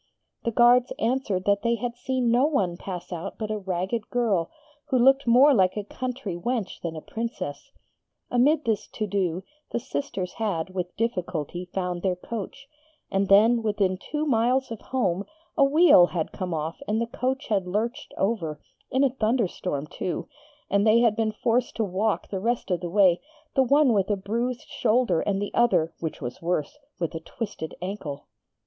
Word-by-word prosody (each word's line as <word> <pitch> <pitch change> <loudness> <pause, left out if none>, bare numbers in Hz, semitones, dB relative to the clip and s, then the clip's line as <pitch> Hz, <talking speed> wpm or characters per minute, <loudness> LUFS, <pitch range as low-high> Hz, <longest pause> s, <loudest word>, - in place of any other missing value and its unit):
The 235 - +1
guards 240 +2 +5
answered 225 -6 0
that 200 0 +3
they 235 +1 +2
had 235 +1 -4
seen 250 -1 0
no 250 +5 +4
one 195 - 0
pass 180 0 -6
out 170 -1 -6
but 215 -1 -3
a 215 - -2
ragged 190 +4 -2
girl, 210 -9 +1 0.4
who 280 -4 +1
looked 270 +2 +4
more 260 +5 +7
like 190 -4 +3
a 210 - -2
country 250 -2 -4
wench 220 +2 -3
than 165 -1 -4
a 155 - -6
Princess. 195 - -5 0.6
Amid 285 +5 +3
this 220 -3 0
to 215 - -3
do, 190 -3 -1 0.3
the - - -2
sisters 230 -7 -4
had 185 -6 -1
with 180 -1 -4
difficulty 180 -6 -2
found 180 -2 -2
their 185 -1 +1
coach; 230 +8 -7 0.4
and 195 0 +1
then, 225 +4 +6
within 205 -4 +1
two 300 +10 -3
miles 255 0 +2
of 225 - -6
home, 200 -8 -1 0.3
a 280 - +5
wheel 285 - +7
had 165 -3 -3
come 185 -2 -4
off 160 0 -3
and 215 +1 +1
the 230 - +1
coach 260 +4 -3
had 195 -4 +1
lurched 230 +9 -2
over, 175 -8 -1 0.3
in 265 +2 +2
a 270 - +3
thunderstorm, 215 - -1
too; 165 +2 -4 0.4
and 200 +2 +2
they 225 +2 +6
had 230 -3 +4
been 220 -1 0
forced 235 +3 0
to 225 - 0
walk 205 +2 -1
the 195 - -3
rest 230 0 -1
of 180 - +1
the 175 - -4
way, 185 -2 +4 0.3
the 270 - +4
one 275 0 +4
with 195 -1 +1
a 205 - +1
bruised 235 +5 -3
shoulder, 215 -7 +2
and 195 -1 0
the 205 - -4
other 170 -9 +3
(which 160 -2 -4
was 125 -2 -6
worse) 170 - -2 0.2
with 170 -2 -2
a 165 - -4
twisted 195 -2 -6
ankle. 170 -7 -5
210 Hz, 180 wpm, -26 LUFS, 180-240 Hz, 0.6 s, more